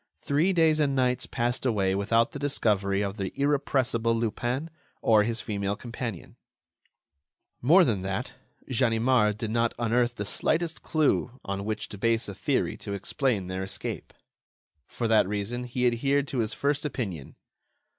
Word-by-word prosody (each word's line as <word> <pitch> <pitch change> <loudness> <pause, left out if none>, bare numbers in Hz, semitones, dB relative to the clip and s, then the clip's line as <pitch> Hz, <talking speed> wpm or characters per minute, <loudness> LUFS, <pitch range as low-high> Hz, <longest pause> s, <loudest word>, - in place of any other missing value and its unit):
Three 150 +7 +2
days 160 -3 +3
and 140 -2 +2
nights 125 -1 +1
passed 120 0 -1
away 100 -7 +1
without 115 +4 +2
the 145 - -7
discovery 105 -8 +1
of 100 +1 -4
the 95 -2 -3
irrepressible 130 -5 +1
Lupin 120 +7 -2 0.3
or 110 -2 +5
his 115 +2 -1
female 100 -2 -2
companion; 115 -4 -6 1.2
more 170 +10 +6
than 110 - +1
that, 95 0 -3 0.3
Ganimard 115 -2 +2
did 110 0 -3
not 115 0 +1
unearth 120 +1 +1
the 105 - -4
slightest 160 +10 -1
clue 145 -5 0
on 100 0 -3
which 110 0 -3
to 105 - -9
base 115 +1 +1
a 100 - -5
theory - - -1
to 100 - -6
explain 100 +1 -1
their 95 +1 -4
escape. 95 +1 -5 0.8
For 120 - -3
that 110 -4 +4
reason, 105 +5 -3
he 125 +1 -1
adhered 135 +4 +2
to 130 - -2
his 110 -2 0
first 145 0 0
opinion. 110 - -4
115 Hz, 155 wpm, -27 LUFS, 105-135 Hz, 1.2 s, more